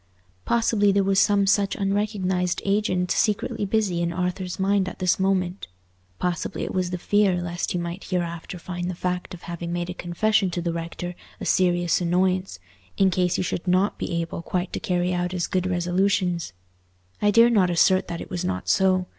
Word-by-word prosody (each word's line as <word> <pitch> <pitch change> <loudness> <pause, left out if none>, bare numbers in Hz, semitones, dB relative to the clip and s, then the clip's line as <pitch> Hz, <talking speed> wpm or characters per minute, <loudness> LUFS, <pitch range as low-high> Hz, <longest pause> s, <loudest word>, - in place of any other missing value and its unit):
Possibly 225 -3 +3
there 200 0 +2
was 195 0 +2
some 205 -1 +4
such 200 0 +2
unrecognized 195 -3 0
agent 195 -3 +1
secretly 210 -1 0
busy 195 -5 0
in 170 0 0
Arthur's 180 +1 -3
mind 195 -1 +2
at - - -11
this 185 0 +1
moment—possibly 170 - -3
it - - -4
was 185 -1 0
the 180 - -3
fear 195 0 +2
lest 175 0 -3
he - - 0
might 170 +2 -5
hereafter 175 0 -3
find 175 0 -5
the 185 - -4
fact 180 0 -3
of 175 - -15
having 170 0 -5
made 175 +1 -2
a - - -5
confession 190 +3 +1
to 175 - -3
the 170 -1 -2
rector 170 +1 -5 0.3
a - - -5
serious 175 -1 +2
annoyance, 185 - +1 0.4
in 195 -1 +4
case 180 -1 +1
he - - 0
should 180 0 -3
not 185 +3 +2
be 170 -2 -2
able 165 0 -5
quite 180 +2 -3
to - - -2
carry 180 0 0
out 180 0 -1
his 175 -2 -1
good 185 0 -1
resolutions? 180 - 0 0.7
I 205 - +4
dare 230 +3 +6
not 195 -6 +4
assert 185 +2 +3
that 170 - -5
it - - -9
was 175 - -2
not 90 0 -3
so. 185 -1 +3
180 Hz, 190 wpm, -24 LUFS, 175-195 Hz, 0.7 s, dare